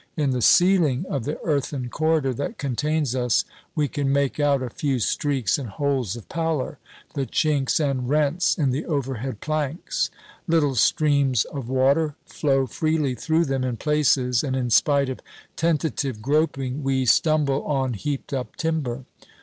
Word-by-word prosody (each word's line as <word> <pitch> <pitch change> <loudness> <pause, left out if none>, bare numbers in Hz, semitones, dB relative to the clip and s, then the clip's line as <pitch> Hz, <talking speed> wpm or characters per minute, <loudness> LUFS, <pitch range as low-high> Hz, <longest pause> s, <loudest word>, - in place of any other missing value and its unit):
In 145 -3 +1
the 125 -1 -1
ceiling 175 - +4
of 135 -5 -2
the 150 - -3
earthen 140 -4 -1
corridor 155 -1 +1
that 140 +4 -4
contains 145 +1 -1
us, 125 -2 +1 0.3
we 150 -2 +1
can 140 0 -1
make 140 +1 0
out 140 -2 +2
a 125 - -4
few 140 0 -1
streaks 130 0 0
and 130 -5 -6
holes 130 -2 -1
of 120 - -10
pallor 160 -5 -2 0.3
the 135 -2 -2
chinks 145 -4 +1
and 135 -5 -1
rents 150 +4 +2
in 140 -5 +1
the 140 +6 -3
overhead 135 -6 -3
planks. 155 +1 -2 0.4
Little 160 -4 +2
streams 140 -1 +2
of 135 -5 -7
water 140 +4 +2
flow 135 -3 +1
freely 155 +1 0
through 160 +7 +1
them 135 -2 -1
in 125 -2 -2
places, 135 -5 +2
and 135 -3 -1
in 125 -2 -1
spite 140 +3 +4
of 130 - -5 0.4
tentative 150 -6 -1
groping 135 +1 0
we 135 -1 0
stumble 145 +1 +2
on 135 -4 0
heaped 140 +7 -4
up 130 -2 -4
timber. 140 -6 -2
140 Hz, 160 wpm, -24 LUFS, 130-150 Hz, 0.4 s, ceiling